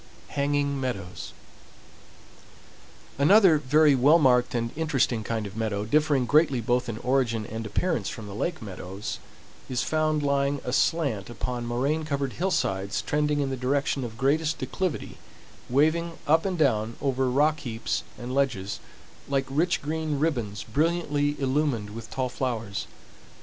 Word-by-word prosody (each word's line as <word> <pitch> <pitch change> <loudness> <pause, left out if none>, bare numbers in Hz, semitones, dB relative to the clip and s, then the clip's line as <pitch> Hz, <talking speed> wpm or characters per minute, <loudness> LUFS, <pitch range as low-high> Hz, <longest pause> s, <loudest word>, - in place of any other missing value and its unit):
HANGING 140 -1 0
MEADOWS 95 - -4 1.9
Another, 175 +1 +6
very 150 +2 +4
well 140 +5 +6
marked 125 -5 +3
and 115 -1 -1
interesting 135 -7 0
kind 110 -1 -2
of 100 -1 -8
meadow, 105 -2 -2
differing 145 +1 +2
greatly 145 -1 +3
both 125 +1 0
in 110 - -4
origin 120 -3 0
and 110 +1 -5
appearance 110 - -1
from 110 - -7
the 100 - -8
lake 160 - -3
meadows, 95 0 -6 0.5
is 125 -2 0
found 155 -1 +1
lying 140 0 +1
aslant 130 -4 0
upon 120 0 -4
moraine 140 +7 0
covered 140 -3 -2
hillsides 100 - -1
trending 150 0 +1
in 135 -1 -1
the - - -1
direction 135 +2 0
of 115 -2 -6
greatest 150 +4 +1
declivity, 145 +6 -3 0.5
waving 160 +6 +2
up 160 +4 +3
and 185 -2 -1
down 115 -7 +1
over 130 -2 0
rock 150 +4 +2
heaps 115 -4 -3 0.2
and 125 +1 -6
ledges, 130 -8 0 0.5
like 135 -1 +1
rich 170 +5 +1
green 155 0 -2
ribbons 120 -10 -1
brilliantly 150 -2 0
illumined 130 -6 0
with 115 +1 -8
tall 130 -1 -1
flowers. 115 -7 -3
135 Hz, 140 wpm, -26 LUFS, 115-150 Hz, 1.9 s, Another